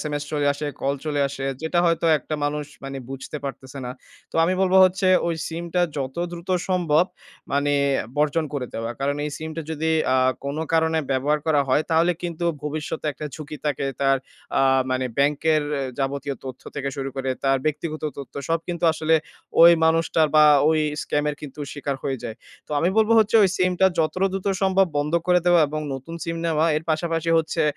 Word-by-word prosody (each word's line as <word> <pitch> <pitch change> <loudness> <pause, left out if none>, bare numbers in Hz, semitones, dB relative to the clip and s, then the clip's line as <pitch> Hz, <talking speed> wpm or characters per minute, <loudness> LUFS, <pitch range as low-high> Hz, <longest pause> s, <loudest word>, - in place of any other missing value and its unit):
SMS 145 -1 -3
চলে 145 -1 0
আসে, 145 +1 -5
call 140 +1 0
চলে 145 -2 -1
আসে। 135 0 -6 0.2
যেটা 160 +2 0
হয়তো 165 0 +1
একটা 155 - -5
মানুষ 150 +1 -1 0.2
মানে 135 0 -5
বুঝতে 135 +3 -6
পারতেছে 135 0 -7
না। 125 - -4 0.4
তো - - -4
আমি 185 +3 +1
বলব 190 0 +2
হচ্ছে 185 +1 +1 0.2
ওই 170 - 0
সিমটা 170 +2 -2 0.2
যত 135 -2 -4 0.2
দ্রুত 170 +1 -9 0.2
সম্ভব 175 -3 +3 0.5
মানে 145 +1 +1 0.4
বর্জন 150 +2 +1
করে 130 -3 -2
দেওয়া। 115 +1 -3
কারণ 140 +1 0
এই 150 - -3
সিমটা 160 +1 -5
যদি 160 +1 -1 0.2
আ - - +4 0.3
কোন 140 +2 -3 0.2
কারণে 160 0 +2
ব্যবহার 140 +3 +1
করা 150 -3 +3
হয়, 140 +4 +3
তাহলে 165 +2 +3
কিন্তু 170 -1 -3 0.2
ভবিষ্যতে 150 +1 -4
একটা 150 +2 -6
ঝুঁকি 150 0 -7
থাকে 145 -2 -1 0.2
তার 135 0 +4 0.4
আ - - +4 0.3
মানে 130 0 0
ব্যাংকের 150 +2 +2 0.2
এ - - -1 0.2
যাবতীয় 140 +1 -2
তথ্য 130 -1 -8
থেকে 140 -1 -2
শুরু 135 -1 -3
করে 135 -1 -2
তার 135 0 +3
ব্যক্তিগত 155 +1 -2 0.2
তথ্য, 135 -3 -9
সব 165 - +2
কিন্তু 175 -1 -2
আসলে 160 +1 +1 0.5
ওই 170 - +10
মানুষটার 160 -1 +3
বা 150 - +8 0.2
ওই 160 -1 +3 0.2
স্ক্যামের 150 0 -1
কিন্তু 150 0 -9
শিকার 140 -1 -3
হয়ে 135 -2 -2
যায়। 115 -2 -6 0.3
তো - - -22
আমি 170 - +2
বলব 220 +1 +3
হচ্ছে 220 +1 +4
ওই 195 - +5
সিমটা 185 +1 +3
যতটা 185 +4 +1
দ্রুত 195 0 -4 0.2
সম্ভব 190 0 +4
বন্ধ 150 +2 -1
করে 180 0 +4
দেওয়া 175 -1 +6
এবং 155 +1 -3
নতুন 135 +5 -8
সিম 165 0 -3
নেওয়া। 160 -1 +2
এর 155 - -2
পাশাপাশি 165 +1 0
হচ্ছে 160 0 -1
155 Hz, 190 wpm, -23 LUFS, 140-165 Hz, 0.5 s, ওই